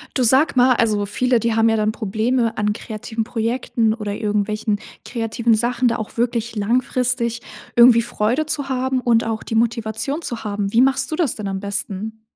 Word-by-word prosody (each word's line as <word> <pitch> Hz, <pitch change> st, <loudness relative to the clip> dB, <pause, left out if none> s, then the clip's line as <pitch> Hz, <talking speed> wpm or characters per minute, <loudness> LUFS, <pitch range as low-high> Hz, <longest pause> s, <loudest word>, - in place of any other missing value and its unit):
Du 255 Hz, -, +2 dB
sag 265 Hz, +5 st, +4 dB
mal, 250 Hz, 0 st, +5 dB
also, 210 Hz, -3 st, +1 dB
viele, 250 Hz, +4 st, +1 dB
die 230 Hz, 0 st, 0 dB
haben 225 Hz, 0 st, +3 dB
ja 225 Hz, -, +2 dB
dann 215 Hz, 0 st, +1 dB
Probleme 225 Hz, +2 st, -1 dB
an 210 Hz, 0 st, +1 dB
kreativen 220 Hz, +1 st, -5 dB
Projekten 230 Hz, 0 st, -1 dB
oder 210 Hz, -3 st, -4 dB
irgendwelchen 210 Hz, 0 st, -1 dB, 0.2 s
kreativen 230 Hz, -1 st, 0 dB
Sachen, 240 Hz, +3 st, 0 dB
da 235 Hz, -, +2 dB
auch 215 Hz, -, -7 dB
wirklich 235 Hz, -1 st, -1 dB
langfristig 240 Hz, +2 st, 0 dB, 0.3 s
irgendwie 235 Hz, -1 st, +7 dB
Freude 240 Hz, +5 st, -1 dB
zu 290 Hz, -3 st, -2 dB
haben 260 Hz, 0 st, 0 dB
und 235 Hz, -2 st, +3 dB
auch 225 Hz, -1 st, -3 dB
die -, -, -5 dB
Motivation 230 Hz, +5 st, -1 dB
zu 240 Hz, -8 st, -5 dB
haben. 205 Hz, -1 st, -3 dB
Wie 230 Hz, -, +4 dB
machst 265 Hz, +1 st, +1 dB
du -, -, 0 dB
das 315 Hz, -8 st, 0 dB
denn 215 Hz, -, -5 dB
am 195 Hz, -1 st, -3 dB
besten? 205 Hz, +2 st, -4 dB
230 Hz, 185 wpm, -20 LUFS, 215-250 Hz, 0.3 s, irgendwie